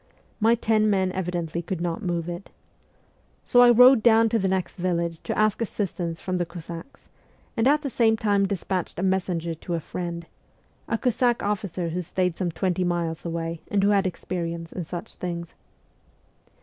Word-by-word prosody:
My 225 +2 +4
ten 215 -2 +2
men 190 -2 +2
evidently 175 -3 -3
could 175 +1 -4
not 170 +1 -2
move 175 -4 -2
it. 175 +2 -6 1.0
So 245 - +5
I 245 - +8
rowed 250 +1 +8
down 225 0 +5
to 225 - +1
the 195 - +1
next 190 -1 -1
village 170 -2 -1
to - - -3
ask 215 +1 +2
assistance 180 -6 -3
from 185 -1 -2
the 175 - 0
Cossacks, 170 - -9 0.5
and 225 +2 +2
at 295 +2 +3
the 280 - -2
same 225 -2 +3
time 205 -2 +2
despatched 190 -2 -3
a 180 - -2
messenger 180 -3 0
to 170 +2 -4
a - - -1
friend 170 +1 -5 0.6
a 230 - 0
Cossack 245 0 +1
officer 195 -4 -2
who 175 +2 -2
stayed 180 0 -1
some 180 -1 -1
twenty 185 +2 -1
miles 170 -2 -2
away 165 0 -3
and 200 -1 +1
who 200 - +4
had 200 -1 +3
experience 170 -2 -4
in 180 - -5
such 175 +1 -7
things. 170 -1 -5
185 Hz, 175 wpm, -25 LUFS, 170-215 Hz, 1.0 s, I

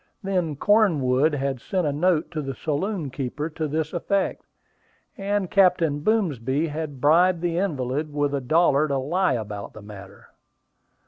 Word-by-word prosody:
Then 180 -6 -1
Cornwood 150 - +3
had 135 -3 -2
sent 185 -3 -1
a 145 - 0
note 160 0 +1
to 155 -3 -3
the 135 -2 -5
saloon 155 - -2
keeper 140 +4 -4
to 155 0 -3
this 155 +1 -2
effect, 195 +3 -1 0.7
and 200 -1 -1
Captain 175 -6 +3
Boomsby 150 - 0
had 150 -2 -5
bribed 170 +5 +4
the 175 -1 0
invalid 150 -4 -2
with 145 -1 -1
a 140 - -1
dollar 155 +1 +3
to 140 -2 -1
lie 170 +6 +1
about 105 -4 -5
the 110 - -11
matter. 100 -1 -12
150 Hz, 150 wpm, -24 LUFS, 135-180 Hz, 0.7 s, bribed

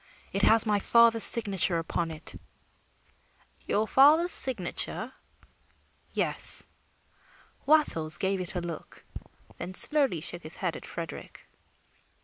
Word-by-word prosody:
"It 195 - -3
has 225 +2 +3
my 210 -2 -1
father's 230 +1 +2
signature 195 -6 +2
upon 165 0 -5
it." 155 0 -10 1.3
"Your 215 +2 -2
father's 310 +8 +3
signature?" 230 +1 +1 1.0
"Yes." - - +2 1.0
Wattles 165 - +1
gave 190 0 -3
it 180 +1 -7
a 180 - -4
look, 170 -2 -11 0.5
then 185 +1 -9
slowly 275 - +4
shook 175 +3 -7
his 155 0 -10
head 180 -4 -5
at - - -11
Frederick. 165 -2 -10
195 Hz, 115 wpm, -25 LUFS, 170-235 Hz, 1.3 s, slowly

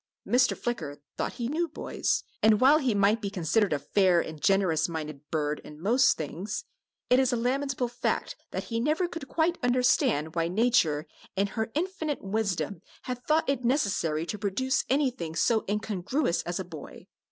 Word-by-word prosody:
Mr. 250 +1 +3
Flicker 160 -12 -3 0.2
thought - - -2
he 235 - -3
knew 330 +6 0
boys, 310 - -1 0.2
and 215 -1 +5
while 280 +4 +6
he 255 -7 +1
might 205 +3 +3
be 200 - -2
considered 195 +2 +1
a 150 - +2
fair 180 +5 +3
and 155 -2 -5
generous 185 -5 +2
minded 155 -3 -5
bird 150 -1 -1
in 150 0 -11
most 240 +9 +3
things, 175 +8 -4 0.5
it 250 - +6
is 260 -1 +3
a - - +1
lamentable 255 +1 0
fact 240 +1 -2
that - - -4
he 230 -1 -3
never 305 +8 +1
could 330 -5 -7
quite 335 +3 0
understand 245 - +2
why 165 -1 0
Nature 175 -7 +2 0.3
in 195 - +2
her 220 +2 -3
infinite 315 -3 -2
wisdom 200 -3 -2 0.2
had 250 -1 -5
thought 310 +1 +3
it 275 -2 0
necessary 200 - +1
to 210 +4 -5
produce 225 +7 0
anything 255 - 0
so 225 +4 +2
incongruous 210 - 0
as 175 +2 -2
a 190 - -4
boy. 160 -4 -10
215 Hz, 175 wpm, -28 LUFS, 170-255 Hz, 0.5 s, while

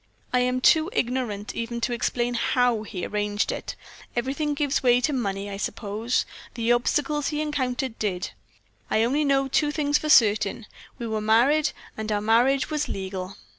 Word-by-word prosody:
I 250 - +4
am 250 0 +1
too 315 +5 +5
ignorant 235 -5 -2
even 235 +1 -3
to 245 - 0
explain 240 +1 -1
how 240 -1 +2
he 195 -4 -5
arranged 205 0 -1
it - - -5 0.4
everything 280 +5 -1
gives 285 -1 0
way 245 -2 +4
to 270 +4 0
money, 200 -5 -2
I 200 -1 -5
suppose 215 +3 -2 0.3
the 230 0 +1
obstacles 290 +4 +1
he 300 -2 -2
encountered 260 -5 -2
did. 190 -4 -2 0.6
I 220 - +2
only 275 +6 +1
know 275 -1 +2
two 295 +3 +1
things 295 -1 +1
for 305 - -4
certain 215 -3 +4 0.3
we 235 - -5
were 220 -1 -2
married, 260 +8 +3 0.3
and 220 0 -4
our 205 - +1
marriage 245 +7 +2
was 300 -1 -1
legal." 190 0 -5
240 Hz, 170 wpm, -25 LUFS, 215-275 Hz, 0.6 s, too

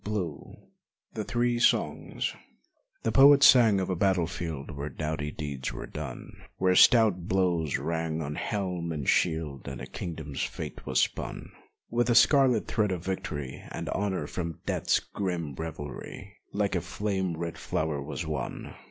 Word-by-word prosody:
121 95 -8 -5 0.4
THE 110 - -3
THREE 120 +2 0
SONGS - - +1 0.7
The 115 - +1
poet 140 +4 +7
sang 115 -7 +7
of 95 0 -1
a - - 0
battle 95 -1 +2
field 80 -4 -5
Where 70 0 -5
doughty 75 +1 -3
deeds 70 -4 -4
were - - -6
done, 70 -5 -7 0.2
Where 95 0 +3
stout 105 -6 +6
blows 85 -6 +1
rang 80 -1 -2
on 75 0 -4
helm 90 -3 -2
and 75 -5 -4
shield 80 -6 +1
And 70 -2 -5
a - - -6
kingdom's 80 -5 -6
fate - - -5
was - - +2
spun - - -2 0.4
With 120 0 +2
the 120 - +3
scarlet 130 -3 +5
thread 105 -3 0
of 90 -2 -4
victory, 75 -8 -4
And - - -5
honor 95 -6 -1
from 85 +1 -5
death's - - +1
grim 90 -7 -4
revelry 80 +6 -7 0.2
Like 100 -1 0
a 90 - +1
flame 95 -5 -2
red 85 0 -4
flower 75 -2 -2
was 80 +4 -5
won! 75 -4 -4
85 Hz, 155 wpm, -28 LUFS, 75-100 Hz, 0.7 s, poet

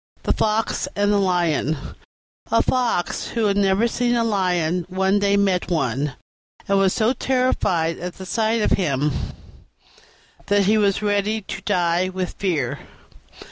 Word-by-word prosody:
THE - - +1
FOX 220 +1 0
AND 205 0 +2
THE 205 - +3
LION 170 -5 +1 0.7
A 230 - +4
Fox 245 -8 0
who 230 -2 -1
had 200 -1 +2
never 200 +3 +2
seen 240 +1 0
a 235 - +2
Lion 180 -5 0
one 190 +2 +1
day 200 0 +2
met 190 -3 +1
one, 135 -4 -1 0.5
and 195 0 +3
was 195 -1 +3
so 220 +5 +1
terrified 240 -11 0
at 180 0 -6
the 190 - -8
sight 220 +2 0
of - - +1
him 150 -5 +1 1.4
that 205 0 +3
he 215 +2 +3
was 200 0 +1
ready 205 +1 0
to 195 - -7
die 175 +1 +1
with 185 -1 -4
fear. 160 -11 -1
195 Hz, 150 wpm, -22 LUFS, 175-215 Hz, 1.4 s, A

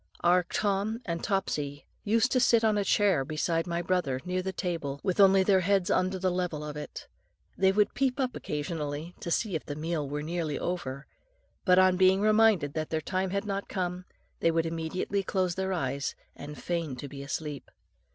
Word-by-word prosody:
Our 175 +1 +4
Tom 205 +2 0
and 170 -2 -3
Topsy 145 -8 -2 0.2
used 230 +4 +2
to 255 - +3
sit 235 -2 +4
on 215 -1 +3
a 205 - +1
chair 195 -8 +3
beside 165 +4 -1
my 170 0 -2
brother, 170 -8 0
near 180 0 -1
the 190 +1 -3
table, 165 -7 -3
with 185 -1 -1
only 195 -1 +7
their 190 0 +4
heads 190 0 +1
under 185 +1 +1
the 185 0 0
level 175 -4 -2
of 150 0 -6
it. 150 - -7 0.5
They 190 0 +4
would 205 +1 +2
peep 270 0 0
up 255 -2 -1
occasionally 150 +1 -4
to 170 - -5
see 200 +4 0
if 160 - -2
the 145 - -6
meal 155 -2 -2
were 150 +1 -3
nearly 160 -2 -2
over; 140 -6 -4 0.6
but 180 -2 +5
on 185 -1 +5
being 190 +1 +5
reminded 215 -8 +4
that 155 -1 -3
their 160 - 0
time 185 +4 -2
had 200 +2 -2
not 200 -1 -3
come, 180 -1 -3 0.3
they - - +3
would 165 0 +1
immediately 165 +4 -2
close 185 -2 0
their 190 +1 -2
eyes 140 -6 -2 0.2
and 150 +1 -9
feign 170 -6 -2
to 140 - -7
be 140 0 -8
asleep. 145 +1 -5
180 Hz, 195 wpm, -29 LUFS, 155-195 Hz, 0.6 s, only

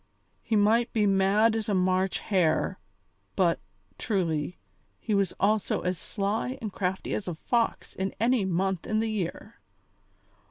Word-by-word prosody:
He 225 - -1
might 220 +3 +3
be 215 -2 +2
mad 200 +3 +3
as 220 -1 -2
a 205 - +2
March 185 +1 +1
hare, 180 -6 +1 0.6
but, - - +2 0.4
truly, 175 -6 -1 0.4
he 220 - -2
was 200 -2 +2
also 210 0 +1
as 180 0 -1
sly 220 +5 -2
and 215 -4 -5
crafty 190 0 -2
as 200 - -3
a 175 - -3
fox 230 +7 -1
in 190 +1 -2
any 235 0 +3
month 190 0 -1
in 215 - 0
the 220 0 0
year. 190 -6 -4
200 Hz, 150 wpm, -27 LUFS, 185-220 Hz, 0.6 s, might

